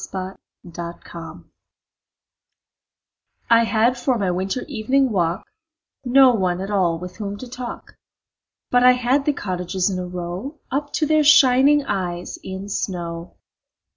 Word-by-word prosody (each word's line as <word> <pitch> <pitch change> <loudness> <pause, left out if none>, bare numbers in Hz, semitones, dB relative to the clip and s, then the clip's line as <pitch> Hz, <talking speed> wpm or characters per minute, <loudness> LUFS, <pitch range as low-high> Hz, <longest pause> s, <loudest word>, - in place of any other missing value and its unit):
Good 190 0 -5 0.4
Hours 170 0 -8 2.1
I 230 0 +6
HAD 230 +3 +1
for 250 0 +1
my 195 -4 0
winter 190 +7 -2
evening 265 0 +1
walk 175 -3 0 0.6
No 260 0 +6
one 185 -5 0
at 195 +2 -5
all 180 -5 +1
with 180 +2 -9
whom 205 -2 -5
to 255 - -9
talk, 245 0 -8 0.8
But 245 - +4
I 250 0 +8
had 250 +3 +1
the 295 - +2
cottages 185 -2 -2
in 185 - -3
a 180 - -4
row 180 - -6
Up 285 +2 -2
to 310 - +1
their 310 0 +3
shining 280 -1 +5
eyes 180 -4 -3
in 190 +1 -6
snow. 170 -4 -4
205 Hz, 140 wpm, -21 LUFS, 180-255 Hz, 2.1 s, I